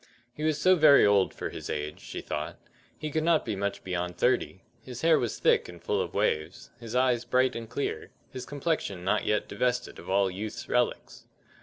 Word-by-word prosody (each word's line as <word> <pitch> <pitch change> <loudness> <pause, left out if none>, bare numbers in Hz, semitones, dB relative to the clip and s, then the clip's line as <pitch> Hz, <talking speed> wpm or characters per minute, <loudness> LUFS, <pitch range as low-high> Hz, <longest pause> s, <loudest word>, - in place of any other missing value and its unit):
He - - -10
was 155 -1 +1
so 185 +3 +5
very 155 -4 +7
old 100 -2 +4
for - - -5
his - - -7
age, 75 0 -4
she - - -7
thought; 75 0 -4 0.4
he 155 - -5
could 155 +1 0
not 165 -1 +3
be 110 - -2
much 100 +1 -3
beyond 90 -1 -3
thirty; 125 -6 0 0.2
his 125 +1 -8
hair 165 -1 +5
was 120 - -2
thick - - +2
and 85 -1 -11
full - - -1
of - - -5
waves, 75 +4 -1
his 115 0 -7
eyes 125 -2 +2
bright 130 +2 +2
and 115 -1 -6
clear, 140 - -3 0.2
his 130 -2 -6
complexion 145 - -2
not 100 +3 +1
yet 105 - +1
divested 125 0 -1
of - - -11
all 95 0 +2
youth's 105 +3 -6
relics. 125 0 -1
120 Hz, 200 wpm, -28 LUFS, 95-140 Hz, 0.4 s, very